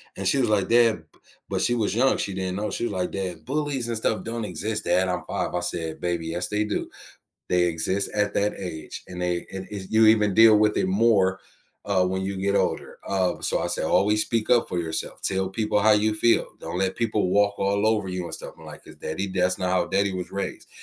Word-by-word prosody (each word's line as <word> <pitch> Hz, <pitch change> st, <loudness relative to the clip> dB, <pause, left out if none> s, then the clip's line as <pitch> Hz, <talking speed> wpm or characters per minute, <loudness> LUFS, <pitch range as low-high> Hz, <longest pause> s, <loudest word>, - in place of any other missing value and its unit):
And 95 Hz, -1 st, -3 dB
she 140 Hz, -, +3 dB
was 120 Hz, -, +2 dB
like, 100 Hz, -3 st, +2 dB
"Dad" 115 Hz, -7 st, +4 dB
b -, -, -27 dB, 0.3 s
but -, -, -1 dB
she 120 Hz, -, +2 dB
was 110 Hz, -2 st, 0 dB
young, 130 Hz, +3 st, +3 dB
she 100 Hz, -, -3 dB
didn't 95 Hz, -1 st, -3 dB
know, 105 Hz, +2 st, -2 dB
she 120 Hz, -, -2 dB
was 105 Hz, -, -3 dB
like, 90 Hz, -1 st, -2 dB
"Dad, 90 Hz, -4 st, -5 dB
bullies 140 Hz, -3 st, -2 dB
and 115 Hz, -1 st, -2 dB
stuff 110 Hz, 0 st, -1 dB
don't 115 Hz, -1 st, -4 dB
exist, 105 Hz, +5 st, -4 dB
dad, 95 Hz, 0 st, +2 dB
I'm 90 Hz, -2 st, -2 dB
5." -, -, -3 dB
I 90 Hz, -, 0 dB
said, 85 Hz, -2 st, -4 dB
"Baby, 85 Hz, -2 st, -2 dB
yes 90 Hz, +2 st, -2 dB
they 105 Hz, 0 st, 0 dB
do. 105 Hz, -, -3 dB, 0.6 s
They 90 Hz, -1 st, +3 dB
exist 85 Hz, +4 st, -1 dB
at 105 Hz, -1 st, 0 dB
that 105 Hz, +1 st, +1 dB
age 80 Hz, -5 st, -7 dB
and 90 Hz, 0 st, -6 dB
they 90 Hz, -1 st, -1 dB
and 95 Hz, 0 st, -6 dB
if 95 Hz, -2 st, -7 dB
you 110 Hz, 0 st, +5 dB
even 105 Hz, -3 st, +4 dB
deal 110 Hz, -1 st, +8 dB
with 105 Hz, 0 st, +2 dB
it 190 Hz, -, +1 dB
more, 100 Hz, -, +3 dB, 0.5 s
uh, 95 Hz, -3 st, +2 dB
when 95 Hz, +1 st, -1 dB
you 95 Hz, 0 st, -3 dB
get 100 Hz, +1 st, +1 dB
older," -, -, -1 dB
uh, 95 Hz, -2 st, 0 dB
so -, -, -1 dB
I -, -, -1 dB
say -, -, -2 dB
"Always 105 Hz, +2 st, +3 dB
speak 115 Hz, -2 st, -1 dB
up 120 Hz, -1 st, +4 dB
for 90 Hz, -, -2 dB
yourself, 80 Hz, -1 st, -4 dB
tell 95 Hz, 0 st, 0 dB
people 105 Hz, +1 st, 0 dB
how 110 Hz, +1 st, +5 dB
you 105 Hz, +1 st, +2 dB
feel, 115 Hz, +2 st, +3 dB
don't 85 Hz, +2 st, -5 dB
let 95 Hz, -1 st, 0 dB
people 105 Hz, -5 st, 0 dB
walk 100 Hz, 0 st, +2 dB
all 100 Hz, +2 st, +1 dB
over 105 Hz, -3 st, +1 dB
you 90 Hz, -1 st, -3 dB
and -, -, -6 dB
stuff," -, -, -9 dB
I'm -, -, -14 dB
like, -, -, -11 dB
"'cause -, -, -14 dB
daddy 95 Hz, +6 st, -4 dB
that's 90 Hz, -1 st, 0 dB
not 90 Hz, -1 st, -1 dB
how 90 Hz, -1 st, +2 dB
daddy 100 Hz, 0 st, +1 dB
was 90 Hz, -1 st, -5 dB
raised." 100 Hz, -, -5 dB
100 Hz, 240 wpm, -25 LUFS, 90-110 Hz, 0.6 s, deal